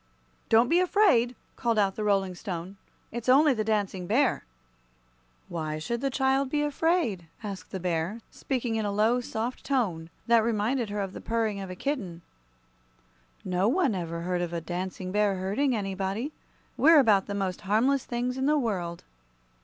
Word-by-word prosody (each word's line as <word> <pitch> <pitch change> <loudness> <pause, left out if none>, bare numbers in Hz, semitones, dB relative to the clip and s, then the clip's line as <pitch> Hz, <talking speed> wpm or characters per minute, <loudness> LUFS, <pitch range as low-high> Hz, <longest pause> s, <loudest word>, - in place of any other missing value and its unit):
"Don't 230 +2 +5
be 340 +6 +4
afraid," 350 - +3 0.2
called 230 -2 0
out 195 -2 +2
the 215 - -3
Rolling 195 -3 +1
Stone; 180 0 -6 0.4
"it's 235 +2 -4
only 285 +2 +6
the 220 -3 -1
Dancing 200 -4 -1
Bear." 250 - +2 1.0
"Why 155 -2 -3
should 235 +10 -3
the 275 - +1
child 265 0 +1
be 295 +1 0
afraid?" 295 - 0 0.2
asked 195 -3 -6
the 190 - -5
bear, 175 +4 -2
speaking 250 -4 -2
in 220 - -1
a 205 - -1
low, 220 +5 +2
soft 235 +1 -4
tone 185 -12 -1 0.2
that 235 -1 +4
reminded 230 +1 0
her 205 0 -2
of 195 -1 -4
the - - -8
purring 225 -3 -1
of 195 -1 -6
a 185 - -6
kitten. 185 - -4 1.2
"No 185 +2 +1
one 275 - +2
ever 170 -2 -4
heard 180 +1 -1
of 175 -1 -3
a 170 - -1
Dancing 185 +2 -5
Bear 205 -1 +2
hurting 205 +9 0
anybody. 195 +5 -2 0.5
We're 320 +2 +7
about 215 -8 +4
the 200 - -3
most 190 -2 -2
harmless 235 +7 +2
things 250 +2 -2
in 265 - +1
the 300 +1 +3
world." 180 -10 -2
215 Hz, 170 wpm, -27 LUFS, 185-255 Hz, 1.2 s, We're